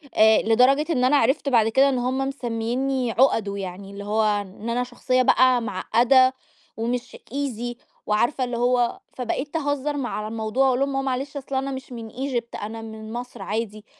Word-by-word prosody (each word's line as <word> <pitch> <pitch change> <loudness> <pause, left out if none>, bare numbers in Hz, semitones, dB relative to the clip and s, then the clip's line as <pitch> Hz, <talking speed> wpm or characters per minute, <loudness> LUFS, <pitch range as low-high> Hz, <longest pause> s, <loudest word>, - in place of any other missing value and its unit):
آآ 220 0 +6
لدرجة 250 +6 +4
إن 250 -6 +1
أنا 280 +3 +5
عرِفت 275 +3 +2
بَعد 225 -4 +4
كده 270 +5 +4
إن 260 - 0
هُم 255 +2 -1
مسميّيني 250 0 -2
عُقَدُه 220 -5 +2
يعني، 195 +1 -7
اللي 200 0 -8
هو 215 +2 +1 0.2
إن 205 +3 -8
أنا 245 +1 0
شخصية 255 +1 0
بقى 255 -1 +4
معقّدة 245 +6 +3 0.4
ومش 245 +2 -3 0.2
easy 245 -4 -3 0.3
وعارفة 240 +5 +1
اللي 245 -1 -2
هو، 245 +7 +1
فبقيت 265 +5 -3
أهزّر 290 -1 -1
م 265 -3 -2
على 215 -2 -4
الموضوع 220 +3 -1
وأقول 255 -1 +2
لهم: 275 0 0
"آه 270 - +1
معلش 270 +2 -3
أصل 270 0 -5
أنا 270 +1 -1
مش 265 0 -7
من 230 -2 -7
Egypt 250 -3 -4
أنا 225 +2 -6
من 220 0 -8
مصر 245 -2 -7
عادي." 215 +1 -4
245 Hz, 180 wpm, -24 LUFS, 225-265 Hz, 0.4 s, آآ